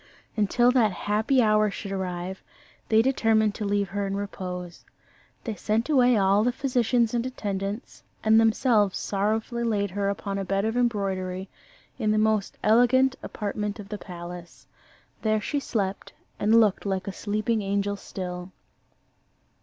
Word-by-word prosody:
Until 240 Hz, +4 st, +3 dB
that 235 Hz, -5 st, +3 dB
happy 215 Hz, +7 st, +1 dB
hour 215 Hz, -1 st, +3 dB
should 200 Hz, 0 st, -6 dB
arrive, 185 Hz, -1 st, -4 dB, 0.5 s
they 220 Hz, 0 st, +5 dB
determined 225 Hz, -5 st, +2 dB
to 210 Hz, -, -4 dB
leave 200 Hz, -1 st, 0 dB
her 200 Hz, +1 st, -2 dB
in 195 Hz, -, -2 dB
repose. 180 Hz, -3 st, -6 dB, 0.6 s
They 225 Hz, -, -3 dB
sent 220 Hz, +5 st, -1 dB
away 250 Hz, -5 st, +4 dB
all 200 Hz, +1 st, +3 dB
the 245 Hz, -, +2 dB
physicians 245 Hz, -3 st, +1 dB
and 235 Hz, -1 st, +1 dB
attendants, 205 Hz, -3 st, -4 dB, 0.2 s
and 220 Hz, 0 st, +5 dB
themselves 220 Hz, -3 st, +3 dB
sorrowfully 220 Hz, +4 st, -1 dB
laid 205 Hz, -4 st, 0 dB
her 200 Hz, +1 st, -1 dB
upon 200 Hz, 0 st, -3 dB
a -, -, -2 dB
bed 195 Hz, +2 st, 0 dB
of 225 Hz, +1 st, -1 dB
embroidery, 195 Hz, -5 st, -1 dB, 0.5 s
in 215 Hz, -3 st, 0 dB
the 215 Hz, -, +2 dB
most 215 Hz, -2 st, +1 dB
elegant 245 Hz, +4 st, +4 dB
apartment 210 Hz, 0 st, -4 dB
of 200 Hz, -1 st, -9 dB
the 210 Hz, -1 st, -5 dB
palace. 175 Hz, -1 st, -9 dB, 0.6 s
There 215 Hz, -1 st, +2 dB
she 285 Hz, +7 st, -2 dB
slept 200 Hz, -8 st, -3 dB, 0.3 s
and 220 Hz, +2 st, +5 dB
looked 210 Hz, -4 st, +3 dB
like 190 Hz, -1 st, -2 dB
a 195 Hz, -, -3 dB
sleeping 215 Hz, +3 st, -1 dB
angel 200 Hz, 0 st, -1 dB
still. 180 Hz, -2 st, -6 dB
210 Hz, 150 wpm, -26 LUFS, 195-225 Hz, 0.6 s, they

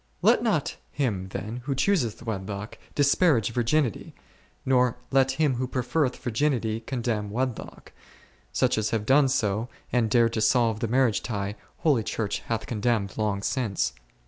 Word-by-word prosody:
Let -, -, +5 dB
not -, -, 0 dB
him 105 Hz, -10 st, -2 dB
then 105 Hz, +4 st, -5 dB
who 135 Hz, -1 st, -1 dB
chooseth 130 Hz, -, +1 dB
wedlock 100 Hz, -1 st, -5 dB, 0.2 s
disparage 140 Hz, -, +3 dB
virginity; 120 Hz, -, 0 dB, 0.5 s
nor 125 Hz, -2 st, +3 dB
let 135 Hz, -1 st, +3 dB
him 140 Hz, -3 st, +1 dB
who 130 Hz, +1 st, -1 dB
preferreth 130 Hz, +2 st, 0 dB
virginity 120 Hz, -3 st, 0 dB
con 120 Hz, +1 st, -5 dB
demn 105 Hz, -4 st, -1 dB
wedlock: 125 Hz, +2 st, -4 dB, 0.6 s
such -, -, +2 dB
as 110 Hz, -, 0 dB
have 110 Hz, -2 st, -1 dB
done 135 Hz, +3 st, +5 dB
so, 110 Hz, -2 st, 0 dB, 0.2 s
and 120 Hz, -3 st, +2 dB
dared 115 Hz, 0 st, +3 dB
to 110 Hz, -, -1 dB
solve 115 Hz, -1 st, +3 dB
the 115 Hz, -, -1 dB
marriage 125 Hz, -1 st, +2 dB
tie, 100 Hz, -3 st, -3 dB, 0.2 s
holy 145 Hz, -8 st, +2 dB
Church 110 Hz, -1 st, -2 dB
hath 115 Hz, -1 st, -2 dB
condemned 110 Hz, -3 st, -1 dB
long 105 Hz, -2 st, -1 dB
since. 125 Hz, -6 st, -1 dB
115 Hz, 150 wpm, -26 LUFS, 110-130 Hz, 0.6 s, Let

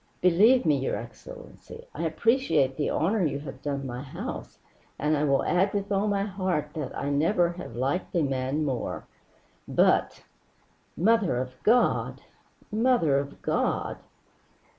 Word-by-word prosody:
"Believe 205 Hz, +8 st, +5 dB
me, 150 Hz, -3 st, +3 dB
your 130 Hz, -, -1 dB
excellency, 485 Hz, -1 st, -10 dB
I -, -, -3 dB
appreciate 160 Hz, -, +2 dB
the 145 Hz, -, -1 dB
honor 190 Hz, +5 st, +1 dB
you 150 Hz, -3 st, 0 dB
have 135 Hz, -2 st, -9 dB
done 140 Hz, -2 st, -3 dB
my 125 Hz, -1 st, -5 dB
house, 135 Hz, -, -7 dB, 0.4 s
and 150 Hz, +2 st, +1 dB
I 145 Hz, -, 0 dB
will 140 Hz, -1 st, +2 dB
add 190 Hz, +3 st, +1 dB
with 200 Hz, 0 st, -2 dB
all 200 Hz, +1 st, +1 dB
my 200 Hz, -1 st, +1 dB
heart 185 Hz, -6 st, -2 dB
that 140 Hz, -2 st, -4 dB
never 170 Hz, +5 st, +2 dB
have 175 Hz, -9 st, -9 dB
I -, -, -6 dB
liked 140 Hz, +9 st, -1 dB
a 170 Hz, -, +3 dB
man 135 Hz, +2 st, -1 dB
more. 130 Hz, -4 st, -3 dB, 0.6 s
But -, -, +2 dB, 0.7 s
Mother 205 Hz, -, +3 dB
of 130 Hz, 0 st, -3 dB
God! 240 Hz, +3 st, +2 dB, 0.5 s
Mother 215 Hz, -, +3 dB
of 140 Hz, 0 st, -7 dB
God!" -, -, -1 dB
165 Hz, 145 wpm, -27 LUFS, 140-205 Hz, 0.7 s, Believe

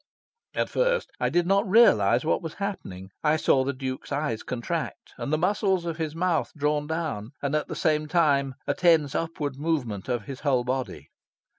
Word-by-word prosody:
At -, -, +1 dB
first -, -, +1 dB
I -, -, +1 dB
did 175 Hz, 0 st, +2 dB
not 195 Hz, +1 st, +2 dB
realise 120 Hz, -, +5 dB
what 160 Hz, -, +1 dB
was 165 Hz, -3 st, -6 dB
happening. 95 Hz, -, -5 dB
I 155 Hz, 0 st, +3 dB
saw 135 Hz, -3 st, +3 dB
the 135 Hz, -, -1 dB
Duke's 130 Hz, 0 st, -5 dB
eyes 140 Hz, -6 st, -1 dB
contract, 120 Hz, -2 st, -4 dB
and -, -, -4 dB
the 155 Hz, -, +3 dB
muscles 190 Hz, 0 st, +1 dB
of 165 Hz, -1 st, -3 dB
his 160 Hz, -2 st, -3 dB
mouth 175 Hz, 0 st, 0 dB
drawn 150 Hz, 0 st, 0 dB
down, 150 Hz, -8 st, -3 dB
and, 140 Hz, 0 st, -2 dB
at 150 Hz, -, 0 dB
the -, -, -5 dB
same 155 Hz, -2 st, +1 dB
time, 140 Hz, -5 st, +2 dB
a -, -, +1 dB
tense 165 Hz, -6 st, +3 dB
upward 150 Hz, -4 st, -3 dB
movement 130 Hz, -, -2 dB
of 120 Hz, -3 st, -1 dB
his 135 Hz, +4 st, -7 dB
whole 135 Hz, -4 st, +1 dB
body. 125 Hz, -, -4 dB
150 Hz, 185 wpm, -26 LUFS, 130-165 Hz, -, realise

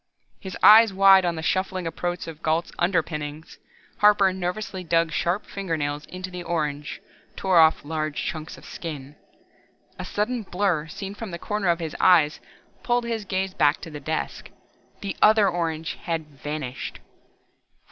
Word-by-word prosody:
His 190 Hz, -2 st, -7 dB
eyes 220 Hz, 0 st, +9 dB
wide 195 Hz, -1 st, +6 dB
on 170 Hz, -1 st, 0 dB
the 160 Hz, -, -5 dB
shuffling 185 Hz, +1 st, -1 dB
approach 175 Hz, +2 st, -3 dB
of 160 Hz, -1 st, -9 dB
Gault's 160 Hz, +2 st, 0 dB
underpinnings, 160 Hz, -3 st, -2 dB, 0.4 s
Harper 205 Hz, -2 st, +5 dB
nervously 185 Hz, +1 st, -4 dB
dug 165 Hz, -1 st, +1 dB
sharp 175 Hz, +4 st, -1 dB
fingernails 150 Hz, -6 st, -3 dB
into 185 Hz, 0 st, -7 dB
the 180 Hz, 0 st, -6 dB
orange, 150 Hz, -4 st, -3 dB, 0.4 s
tore 185 Hz, -3 st, +3 dB
off 160 Hz, -2 st, +4 dB
large 155 Hz, -1 st, -3 dB
chunks 155 Hz, -1 st, -5 dB
of -, -, -15 dB
skin. 145 Hz, -4 st, -7 dB, 0.8 s
A -, -, -3 dB
sudden 230 Hz, +4 st, -2 dB
blur 180 Hz, -5 st, -1 dB
seen 195 Hz, +5 st, -7 dB
from 220 Hz, +1 st, -7 dB
the 170 Hz, -, -5 dB
corner 210 Hz, +2 st, -2 dB
of 170 Hz, -, +3 dB
his 160 Hz, -2 st, -5 dB
eyes 160 Hz, -5 st, +4 dB, 0.4 s
pulled 240 Hz, 0 st, +1 dB
his 230 Hz, -3 st, -3 dB
gaze 190 Hz, 0 st, -2 dB
back 145 Hz, -2 st, +3 dB
to 165 Hz, -, -8 dB
the 150 Hz, -, -7 dB
desk. 155 Hz, +2 st, -4 dB, 0.5 s
The 200 Hz, -1 st, -4 dB
other 215 Hz, -1 st, +6 dB
orange 165 Hz, -3 st, -2 dB
had 165 Hz, -5 st, -3 dB
vanished. 145 Hz, -2 st, -6 dB
175 Hz, 155 wpm, -24 LUFS, 155-195 Hz, 0.8 s, eyes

